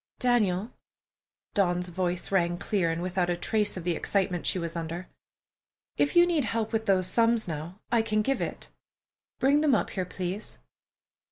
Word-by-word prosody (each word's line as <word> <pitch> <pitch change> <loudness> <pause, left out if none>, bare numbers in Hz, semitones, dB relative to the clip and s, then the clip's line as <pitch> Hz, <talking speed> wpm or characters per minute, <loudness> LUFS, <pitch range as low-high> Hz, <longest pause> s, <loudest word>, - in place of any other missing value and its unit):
"Daniel"—Dawn's 180 -2 +1
voice 175 +1 -1
rang 175 -3 +2
clear 185 -3 0
and 165 +1 -2
without 180 -1 0
a 175 - 0
trace 210 +2 0
of 180 - -5
the 175 -1 0
excitement 185 -2 -1
she - - +2
was 170 -1 -4
under—"if 170 - -6
you 345 0 +8
need 335 -5 +1
help 225 0 -2
with 225 0 -1
those 190 -2 +3
sums 230 +3 +2
now, 165 +4 -6
I 235 -2 +4
can 215 -1 0
give 270 +4 0
it. - - -5 0.7
Bring 280 +3 +3
them 295 -5 +4
up - - -1
here, 185 -2 -2
please." 185 +3 -5
185 Hz, 160 wpm, -28 LUFS, 175-220 Hz, 0.7 s, you